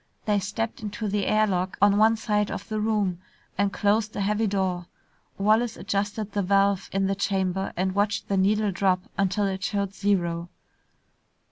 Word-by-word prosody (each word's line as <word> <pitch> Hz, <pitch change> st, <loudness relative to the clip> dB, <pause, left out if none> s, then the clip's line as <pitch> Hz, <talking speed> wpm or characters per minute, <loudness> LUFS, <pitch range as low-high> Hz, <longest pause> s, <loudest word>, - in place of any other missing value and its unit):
They 210 Hz, -1 st, +2 dB
stepped 205 Hz, +4 st, -3 dB
into 210 Hz, +1 st, -4 dB
the 200 Hz, 0 st, -1 dB
air 215 Hz, 0 st, +4 dB
lock 185 Hz, -2 st, -1 dB
on 200 Hz, 0 st, +5 dB
one 220 Hz, +2 st, +4 dB
side 210 Hz, -2 st, 0 dB
of -, -, -6 dB
the 215 Hz, -1 st, -2 dB
room 210 Hz, -5 st, 0 dB, 0.4 s
and 200 Hz, 0 st, +1 dB
closed 210 Hz, +2 st, +1 dB
a -, -, -2 dB
heavy 210 Hz, +2 st, +1 dB
door. 185 Hz, -3 st, -1 dB, 0.5 s
Wallace 220 Hz, +3 st, +2 dB
adjusted 205 Hz, +3 st, -2 dB
the 205 Hz, -, 0 dB
valve 195 Hz, 0 st, +2 dB
in 195 Hz, 0 st, +1 dB
the 195 Hz, -, +1 dB
chamber 190 Hz, -1 st, -1 dB
and 185 Hz, +1 st, 0 dB
watched 205 Hz, +1 st, 0 dB
the 200 Hz, -, 0 dB
needle 205 Hz, +2 st, +2 dB
drop 185 Hz, -1 st, +1 dB
until 195 Hz, +1 st, +1 dB
it 190 Hz, -1 st, -3 dB
showed 200 Hz, 0 st, -1 dB
zero. 175 Hz, -4 st, 0 dB
200 Hz, 170 wpm, -26 LUFS, 190-210 Hz, 0.5 s, on